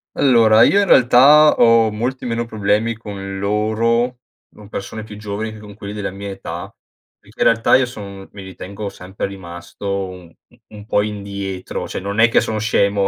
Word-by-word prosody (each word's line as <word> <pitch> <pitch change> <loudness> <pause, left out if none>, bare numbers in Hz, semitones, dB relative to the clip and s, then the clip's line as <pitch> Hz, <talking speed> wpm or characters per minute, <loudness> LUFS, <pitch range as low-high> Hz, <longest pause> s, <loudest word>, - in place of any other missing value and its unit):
Allora, 115 -4 +5
io 200 +9 +4
in 200 - 0
realtà 140 +5 +7
ho 115 -1 +5
molti 125 +5 -4
meno 115 0 -1
problemi 110 +1 -1
con 95 -3 -7
loro, 115 +4 0 0.4
non 105 -1 -14
persone 110 +2 -6
più 105 -1 -10
giovani 105 +1 -5
che 110 - -11
con 105 -1 -12
quelli 100 0 -8
della 105 -2 -4
mia 100 +1 -8
età, 90 -1 -7 0.5
perché - - -22
in - - +2
realtà 115 0 +4
io 130 - +1
son 100 -5 -9
mi 100 -2 -9
ritengo 100 +2 -7
sempre 95 +1 -6
rimasto 85 0 -10
u 95 -3 -4 0.2
u - - -24 0.2
un 105 - -11
po' 105 - +1
indietro 100 -2 -5
cioè, - - -5
non 100 +3 -4
è 115 - +7
che 115 - +3
sono 110 -1 -2
scemo, 100 -2 +1
105 Hz, 185 wpm, -19 LUFS, 100-115 Hz, 0.5 s, realtà